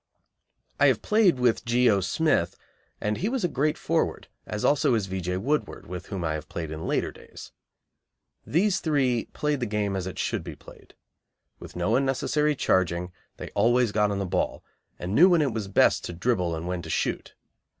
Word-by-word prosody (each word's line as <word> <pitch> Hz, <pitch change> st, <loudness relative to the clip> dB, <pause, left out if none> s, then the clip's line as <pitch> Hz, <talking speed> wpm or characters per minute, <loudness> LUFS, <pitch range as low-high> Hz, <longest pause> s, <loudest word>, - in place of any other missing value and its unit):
I -, -, +6 dB
have -, -, +2 dB
played 210 Hz, -, +3 dB
with 125 Hz, -2 st, +2 dB
G. 125 Hz, +1 st, +2 dB
O. 100 Hz, -4 st, +4 dB
Smith, 95 Hz, -, +1 dB, 0.4 s
and 105 Hz, 0 st, -1 dB
he 200 Hz, -, -1 dB
was 255 Hz, -3 st, -2 dB
a -, -, +3 dB
great 150 Hz, 0 st, 0 dB
forward, -, -, -1 dB, 0.2 s
as 105 Hz, -, -3 dB
also 140 Hz, -4 st, +3 dB
is 110 Hz, -4 st, 0 dB
V. 95 Hz, 0 st, -4 dB
J. 90 Hz, +1 st, -2 dB
Woodward, 145 Hz, +10 st, -2 dB
with 90 Hz, 0 st, -7 dB
whom 95 Hz, -4 st, -4 dB
I 80 Hz, -1 st, 0 dB
have 75 Hz, -1 st, -6 dB
played 80 Hz, -2 st, -5 dB
in 80 Hz, 0 st, -5 dB
later -, -, 0 dB
days. -, -, -13 dB, 0.9 s
These 185 Hz, +5 st, +1 dB
three 135 Hz, -7 st, +1 dB
played 150 Hz, -2 st, -1 dB
the 120 Hz, -, -2 dB
game 105 Hz, -2 st, -1 dB
as 95 Hz, -1 st, -3 dB
it 95 Hz, -, -7 dB
should -, -, -2 dB
be -, -, -8 dB
played. -, -, -16 dB, 0.6 s
With -, -, -11 dB
no 90 Hz, +6 st, +1 dB
unnecessary 140 Hz, +3 st, +1 dB
charging, 90 Hz, -6 st, 0 dB, 0.3 s
they -, -, -7 dB
always 120 Hz, +2 st, +3 dB
got 105 Hz, 0 st, +2 dB
on 100 Hz, -, -2 dB
the 100 Hz, -, -2 dB
ball, 90 Hz, -, -2 dB, 0.3 s
and 90 Hz, +2 st, -4 dB
knew 175 Hz, -, +7 dB
when 170 Hz, -4 st, +4 dB
it 135 Hz, -5 st, -1 dB
was 110 Hz, -3 st, -3 dB
best 95 Hz, -, +3 dB
to -, -, -5 dB
dribble 90 Hz, -3 st, 0 dB
and 80 Hz, +2 st, -5 dB
when 90 Hz, -1 st, -2 dB
to 80 Hz, -, -9 dB
shoot. -, -, -2 dB
105 Hz, 200 wpm, -26 LUFS, 90-140 Hz, 0.9 s, knew